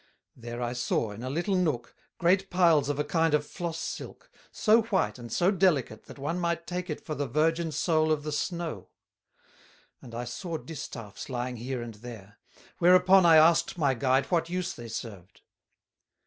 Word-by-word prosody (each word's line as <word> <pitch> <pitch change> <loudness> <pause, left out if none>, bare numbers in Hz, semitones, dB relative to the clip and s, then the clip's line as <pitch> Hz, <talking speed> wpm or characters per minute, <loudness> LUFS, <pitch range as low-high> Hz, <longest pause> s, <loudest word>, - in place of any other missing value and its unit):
There 120 0 -6
I 120 0 -2
saw, 120 -3 -1
in 105 +2 -9
a 130 - -4
little 175 +8 -1
nook, 155 -10 -1 0.2
great 190 +3 +2
piles 165 -6 +3
of 145 - -1
a 150 - +1
kind 160 0 +2
of 150 0 0
floss 170 0 -5
silk, - - -7 0.2
so 220 +1 +4
white 210 - -1
and 120 -2 -9
so 175 - +3
delicate 165 - +1
that - - -12
one 150 +6 -3
might 170 -1 -1
take 180 0 -4
it 150 - -5
for 155 - -3
the 145 -2 -2
virgin 160 +5 +1
Soul 155 +1 +1
of 150 -2 0
the 150 - -4
snow; 160 - -3 1.1
and 120 -2 -11
I 120 - -3
saw 165 +7 -5
distaffs 135 -7 -8
lying 125 -1 -3
here 125 +1 -4
and 115 -1 -8
there; 105 -2 -11 0.4
whereupon 180 +1 +6
I 165 - +7
asked 160 +3 +5
my 140 -5 +2
guide 130 +2 +2
what 165 -1 +1
use 180 0 -2
they 120 - -9
served. 100 -5 -8
155 Hz, 180 wpm, -28 LUFS, 125-170 Hz, 1.1 s, I